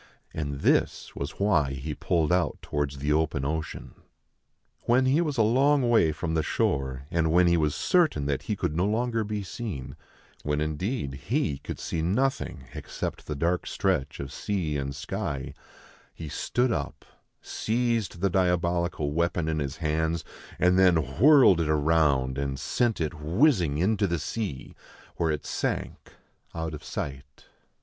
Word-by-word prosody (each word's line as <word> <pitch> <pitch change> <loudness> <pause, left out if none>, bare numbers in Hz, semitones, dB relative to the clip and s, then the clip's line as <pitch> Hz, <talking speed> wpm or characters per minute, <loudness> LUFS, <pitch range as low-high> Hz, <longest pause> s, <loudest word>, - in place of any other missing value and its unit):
And 70 -2 -4
this - - +1
was 70 +2 -5
why 80 -10 +2
he 70 +3 -4
pulled 80 +1 0
out 90 -1 +1
towards 70 -1 -2
the 75 +2 0
open 75 -3 0
ocean. 80 +2 -4 0.9
When 125 +2 +4
he 140 +6 +3
was 150 -5 -1
a 110 - +5
long 135 +4 +3
way 115 -9 +4
from 80 +2 -3
the 80 - +2
shore, 65 -3 -1
and 80 -1 +1
when 90 +2 +5
he 85 0 +4
was 75 -3 +1
certain 160 - +2
that 70 -2 -1
he - - -2
could 75 - -2
no 90 +4 +2
longer 115 +1 0
be 105 -1 -3
seen, 95 - -6 0.5
when 75 0 -1
indeed 75 - -2 0.2
he 110 - 0
could - - -6
see 80 - -3
nothing 115 - -1
except - - -5
the 75 - -3
dark 85 +5 0
stretch 70 +2 -1
of 70 -1 -6
sea 90 -7 -2
and 70 -1 -3
sky, 70 0 -4 0.6
he 80 - -7
stood 125 - 0
up, - - -4 0.3
seized 115 -6 -1
the 100 - +3
diabolical 85 -4 +1
weapon 85 0 0
in 80 -1 0
his 70 0 -3
hands, 80 +1 -1 0.3
and 90 +1 +3
then 80 -6 +3
whirled 135 - +7
it 80 -1 0
round, 75 -4 +2
and 70 -1 -2
sent 120 -3 0
it 80 -1 -1
whizzing 85 - +2
into 100 +4 +2
the 85 -1 0
sea, 80 - -4 0.4
where 85 - +1
it 75 -1 -2
sank - - -3 0.4
out 80 -1 -3
of 75 0 -8
sight. 70 -2 -6
80 Hz, 160 wpm, -27 LUFS, 75-105 Hz, 0.9 s, whirled